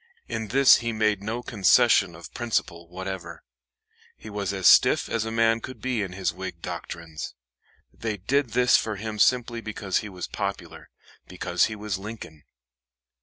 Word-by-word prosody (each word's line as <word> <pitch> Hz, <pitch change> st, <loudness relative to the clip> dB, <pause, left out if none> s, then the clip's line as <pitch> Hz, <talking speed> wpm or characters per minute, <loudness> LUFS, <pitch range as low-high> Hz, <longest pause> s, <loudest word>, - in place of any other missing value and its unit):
In 110 Hz, -1 st, -4 dB
this 135 Hz, +4 st, +6 dB
he 115 Hz, -1 st, -3 dB
made 110 Hz, -2 st, +1 dB
no 115 Hz, +4 st, -4 dB
concession 95 Hz, -5 st, +4 dB
of 85 Hz, -, -12 dB
principle 95 Hz, -8 st, -2 dB
whatever. 95 Hz, +1 st, -7 dB, 0.7 s
He 110 Hz, -, -10 dB
was 100 Hz, -2 st, -2 dB
as 95 Hz, -2 st, -4 dB
stiff -, -, +6 dB
as 115 Hz, -1 st, -1 dB
a 110 Hz, -, -4 dB
man 115 Hz, 0 st, +2 dB
could 130 Hz, -, -8 dB
be 125 Hz, -4 st, -1 dB
in 95 Hz, -3 st, -4 dB
his 95 Hz, 0 st, -2 dB
Whig -, -, -7 dB
doctrines. 80 Hz, -2 st, -7 dB, 0.6 s
They 110 Hz, -2 st, -4 dB
did 125 Hz, +5 st, 0 dB
this 125 Hz, 0 st, +4 dB
for 110 Hz, -1 st, -2 dB
him 105 Hz, +1 st, -6 dB
simply 120 Hz, 0 st, +2 dB
because 100 Hz, -3 st, -2 dB
he 105 Hz, -, -7 dB
was 90 Hz, -2 st, -6 dB
popular -, -, -5 dB, 0.4 s
because -, -, 0 dB
he 110 Hz, -, -4 dB
was 105 Hz, -2 st, -4 dB
Lincoln. 100 Hz, -8 st, -9 dB
105 Hz, 165 wpm, -25 LUFS, 95-115 Hz, 0.7 s, this